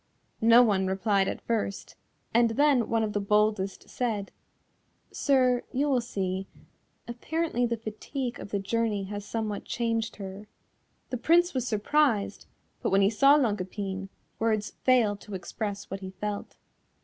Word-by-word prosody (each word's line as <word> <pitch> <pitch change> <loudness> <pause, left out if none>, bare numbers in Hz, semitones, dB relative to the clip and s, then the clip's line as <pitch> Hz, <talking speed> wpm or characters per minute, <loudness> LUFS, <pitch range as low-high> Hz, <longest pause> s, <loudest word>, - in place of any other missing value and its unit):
No 230 +2 +7
one 195 -5 +2
replied 195 0 +1
at - - -5
first, 215 -4 -2 0.4
and 235 0 +5
then 270 0 +3
one 225 -1 +2
of 210 -1 -2
the 205 - 0
boldest 210 -1 +1
said, 220 -5 -2 0.8
"Sir, 255 -3 +2
you 280 +3 +1
will 255 -2 +3
see; 190 -4 -3 0.6
apparently 245 +1 -1
the 235 0 -2
fatigue 240 +3 -5
of - - -8
the 205 - -1
journey 210 0 -1
has 205 +1 -6
somewhat 215 -2 -3
changed 230 -2 -2
her." 195 +1 -8 0.6
The 250 - -1
Prince 345 +7 +3
was 255 -2 -1
surprised, 225 0 +1 0.3
but - - 0
when 195 +1 +4
he 195 - +4
saw 275 +6 +6
Longue 220 -9 +1
Epine 195 0 -5 0.3
words 215 -2 0
fail 240 -5 +2
to 205 0 -9
express 200 +2 -5
what 195 - -3
he 190 -1 -7
felt. 205 +2 -5
215 Hz, 150 wpm, -28 LUFS, 200-245 Hz, 0.8 s, No